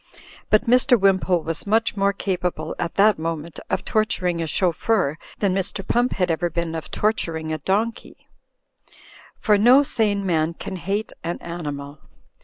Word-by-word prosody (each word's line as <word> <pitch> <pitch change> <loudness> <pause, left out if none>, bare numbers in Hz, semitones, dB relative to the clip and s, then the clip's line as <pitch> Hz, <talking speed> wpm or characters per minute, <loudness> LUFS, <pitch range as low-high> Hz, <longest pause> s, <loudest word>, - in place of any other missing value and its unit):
But 215 0 +4
Mr. 250 0 +4
Wimpole 190 -3 +2
was 165 +3 -3
much 225 +2 +2
more 200 0 +2
capable 180 -5 -3
at 170 - -3
that 205 -2 +4
moment 165 0 -4
of - - -2
torturing 180 -5 0
a 165 - -2
chauffeur 175 -1 0 0.2
than 200 -3 +1
Mr. 195 +1 -2
Pump 245 +1 +1
had 180 -2 0
ever 170 +2 0
been 170 0 -3
of 160 - -6
torturing 165 -7 -1
a 155 - -3
donkey; 210 +9 -2 1.1
for 210 -1 +2
no 250 +6 +6
sane 205 -6 0
man 165 -2 0
can 190 - -6
hate 200 +5 -3
an 170 +1 -3
animal. 145 -4 -6
185 Hz, 155 wpm, -22 LUFS, 165-210 Hz, 1.1 s, no